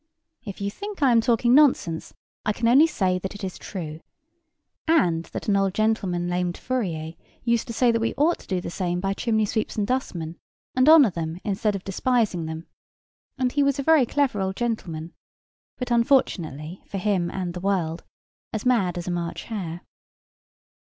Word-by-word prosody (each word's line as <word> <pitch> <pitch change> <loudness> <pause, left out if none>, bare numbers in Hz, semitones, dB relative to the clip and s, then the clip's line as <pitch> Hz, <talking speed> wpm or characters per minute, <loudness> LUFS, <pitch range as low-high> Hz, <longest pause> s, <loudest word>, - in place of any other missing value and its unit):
If 200 -4 -8
you 200 0 -1
think 405 - -6
I 265 - +5
am 230 -1 +5
talking 240 0 +3
nonsense, 255 - +3 0.3
I 210 - +1
can 230 +2 0
only 275 +7 +7
say 185 - 0
that 190 +2 -5
it 205 - -9
is 185 -1 -5
true; 160 -5 -6 0.9
and 175 - +3
that - - -7
an 205 - +3
old 195 -1 +1
gentleman 200 -5 0
named 175 0 -1
Fourier 170 -11 -3 0.3
used 235 -1 +1
to 230 - -5
say 240 +1 +3
that 230 0 0
we 230 - -1
ought 320 +4 +2
to - - -16
do 185 -2 0
the 175 - -6
same 175 -1 -1
by 195 +1 -1
chimney 220 0 +1
sweeps 215 +1 -2
and 210 - 0
dustmen, 175 -9 -3 0.4
and 255 +3 +5
honour 300 -9 +8
them 165 0 -4
instead 205 0 0
of 195 - -5
despising 200 -4 0
them; 160 +1 -6 0.7
and 255 -2 +1
he 285 - +1
was 280 0 +2
a 275 - -2
very 310 -4 +5
clever 270 -8 +1
old 190 0 -1
gentleman: 175 -9 -3 0.6
but, 250 -1 -4
unfortunately 185 - +1
for 200 - -5
him 185 -3 0
and 180 -2 -4
the 180 - -5
world, 175 -4 -1 0.5
as 215 +1 -4
mad 195 -9 +2
as 175 - -5
a - - -1
March 170 -1 -3
hare. 180 -6 -5
200 Hz, 185 wpm, -24 LUFS, 175-240 Hz, 0.9 s, honour